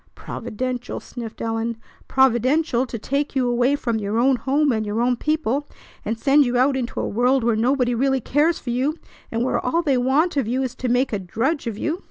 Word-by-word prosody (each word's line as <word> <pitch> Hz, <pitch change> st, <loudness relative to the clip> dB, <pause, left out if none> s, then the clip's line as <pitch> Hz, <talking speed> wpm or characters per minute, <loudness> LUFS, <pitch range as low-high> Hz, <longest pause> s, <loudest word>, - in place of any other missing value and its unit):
"Providential!" 245 Hz, +2 st, -4 dB
sniffed 235 Hz, -3 st, -8 dB
Ellen. 225 Hz, 0 st, -2 dB, 0.3 s
"Providential 265 Hz, +1 st, +2 dB
to 235 Hz, -, -5 dB
take 280 Hz, +6 st, -2 dB
you 255 Hz, -2 st, +2 dB
away 245 Hz, +3 st, +2 dB
from 235 Hz, -5 st, -1 dB
your 205 Hz, +1 st, -2 dB
own 260 Hz, +3 st, +4 dB
home 275 Hz, +4 st, +1 dB
and 220 Hz, -2 st, 0 dB
your 210 Hz, +1 st, -2 dB
own 245 Hz, +1 st, +2 dB
people, 290 Hz, 0 st, -1 dB, 0.4 s
and 220 Hz, +1 st, -2 dB
send 280 Hz, +5 st, +4 dB
you 245 Hz, -2 st, 0 dB
out 265 Hz, +2 st, +3 dB
into 250 Hz, -2 st, -3 dB
a -, -, -1 dB
world 250 Hz, +4 st, +2 dB
where 230 Hz, -1 st, +2 dB
nobody 245 Hz, +2 st, +1 dB
really 265 Hz, +2 st, +1 dB
cares 300 Hz, +7 st, +1 dB
for 245 Hz, -, -5 dB
you, 270 Hz, +6 st, 0 dB, 0.3 s
and 230 Hz, +1 st, 0 dB
where 255 Hz, -, 0 dB
all 335 Hz, +7 st, +1 dB
they 280 Hz, -5 st, +2 dB
want 285 Hz, +6 st, +2 dB
of 265 Hz, -6 st, +1 dB
you 255 Hz, +3 st, 0 dB
is 255 Hz, -2 st, -3 dB
to 255 Hz, -, -2 dB
make 245 Hz, +1 st, +1 dB
a 205 Hz, -, 0 dB
drudge 235 Hz, -, -2 dB
of 220 Hz, -3 st, -3 dB
you! 315 Hz, +9 st, -2 dB
250 Hz, 215 wpm, -22 LUFS, 235-275 Hz, 0.4 s, own